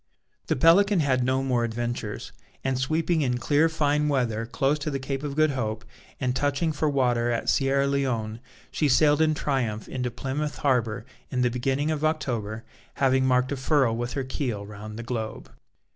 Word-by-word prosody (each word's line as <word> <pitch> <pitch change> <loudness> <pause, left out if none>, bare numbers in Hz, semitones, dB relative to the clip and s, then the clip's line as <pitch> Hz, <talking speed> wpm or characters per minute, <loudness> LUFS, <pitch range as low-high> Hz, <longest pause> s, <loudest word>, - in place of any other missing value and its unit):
The - - +1
Pelican 180 +6 +5
had 130 -3 +2
no 130 +1 +1
more 125 -3 +1
adventures; 120 -2 -4 0.3
and 130 -1 0
sweeping 160 +4 +1
in 125 -3 +1
clear 145 +6 +3
fine 150 -1 +1
weather 115 -5 0
close 135 +5 0
to 150 - -3
the 140 - -2
Cape 135 0 -4
of 145 -2 -4
Good 155 0 +3
Hope, 110 -4 -3 0.3
and 125 -2 0
touching 145 +4 +1
for 155 0 0
water 120 -4 +1
at 115 -1 -1
Sierra 140 0 +2
Leone, 125 -6 -1 0.3
she 150 - +1
sailed 145 +3 +4
in 155 -1 +3
triumph 125 -8 -2
into 125 -1 -3
Plymouth 135 +5 -3
harbour 120 -4 +1 0.2
in 125 -2 0
the 125 - +2
beginning 135 +5 0
of 155 -1 -2
October, 115 -9 -1 0.3
having 130 -1 +2
marked 125 +1 +2
a - - 0
furrow 130 -3 +2
with 120 +2 -3
her 135 - -2
keel 125 -6 -3
round 105 +1 -9
the 120 - -5
globe. 115 -2 -5
130 Hz, 180 wpm, -26 LUFS, 120-145 Hz, 0.3 s, Pelican